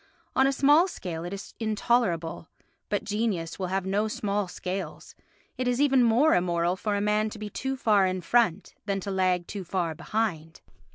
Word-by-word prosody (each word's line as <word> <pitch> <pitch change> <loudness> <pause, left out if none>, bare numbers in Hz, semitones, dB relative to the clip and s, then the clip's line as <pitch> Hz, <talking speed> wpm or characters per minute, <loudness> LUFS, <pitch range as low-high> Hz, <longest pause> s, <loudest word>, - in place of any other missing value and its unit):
On 265 - +5
a - - +3
small 290 +6 +5
scale 170 - -6
it 175 - -5
is 200 0 -7
intolerable, 210 -7 0 0.4
but 205 - -1
genius 210 -6 -2
will 185 - -1
have 190 +1 -1
no 205 +3 +1
small 205 -2 -1
scales; 185 +2 -6 0.5
it 255 - 0
is 250 0 +1
even 270 -3 +4
more 240 +7 +4
immoral 175 0 +1
for 205 +2 -2
a - - 0
man 210 +1 +1
to 215 - -9
be 210 -1 -6
too 265 +5 -3
far 210 -6 +3
in 185 0 -2
front 205 -2 +1
than 200 -1 0
to 200 - -4
lag 185 -2 +1
too 200 +1 -6
far 175 -2 -2
behind. 175 -2 -3
200 Hz, 185 wpm, -27 LUFS, 180-225 Hz, 0.5 s, On